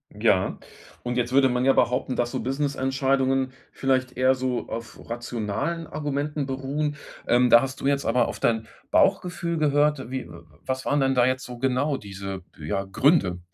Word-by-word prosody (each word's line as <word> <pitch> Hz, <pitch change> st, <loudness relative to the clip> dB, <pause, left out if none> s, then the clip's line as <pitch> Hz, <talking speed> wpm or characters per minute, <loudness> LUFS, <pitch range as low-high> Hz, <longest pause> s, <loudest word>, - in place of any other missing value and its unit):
Ja, -, -, +2 dB, 0.5 s
und 125 Hz, 0 st, -2 dB
jetzt 120 Hz, 0 st, 0 dB
würde 135 Hz, -1 st, +5 dB
man 125 Hz, +1 st, 0 dB
ja 135 Hz, -, +5 dB
behaupten, 125 Hz, +1 st, +1 dB
dass 120 Hz, 0 st, 0 dB
so -, -, -2 dB
Businessentscheidungen 135 Hz, 0 st, 0 dB, 0.2 s
vielleicht 130 Hz, -2 st, 0 dB
eher 130 Hz, +1 st, +4 dB
so 130 Hz, -1 st, -2 dB
auf 115 Hz, -1 st, -7 dB
rationalen 120 Hz, +7 st, -3 dB
Argumenten 145 Hz, -1 st, -3 dB
beruhen. 140 Hz, +3 st, -2 dB, 0.3 s
Ähm, 125 Hz, 0 st, +4 dB
da 120 Hz, -, +9 dB
hast 135 Hz, 0 st, -4 dB
du -, -, -6 dB
jetzt 140 Hz, 0 st, +1 dB
aber 125 Hz, -2 st, +2 dB
auf -, -, -6 dB
dein 110 Hz, -1 st, +1 dB, 0.2 s
Bauchgefühl 170 Hz, -2 st, +1 dB
gehört. 150 Hz, -3 st, +2 dB
Wie 130 Hz, 0 st, -4 dB
w -, -, -14 dB
w -, -, -11 dB, 0.2 s
was 130 Hz, 0 st, -2 dB
waren 145 Hz, -, +2 dB
denn 135 Hz, -1 st, +2 dB
da 125 Hz, -1 st, +4 dB
jetzt 130 Hz, 0 st, -1 dB
so 125 Hz, -1 st, -9 dB
genau 135 Hz, +3 st, +1 dB
diese, 95 Hz, -2 st, -7 dB, 0.2 s
ja, 95 Hz, +6 st, -3 dB
Gründe? 95 Hz, -, +2 dB
130 Hz, 175 wpm, -25 LUFS, 120-140 Hz, 0.5 s, da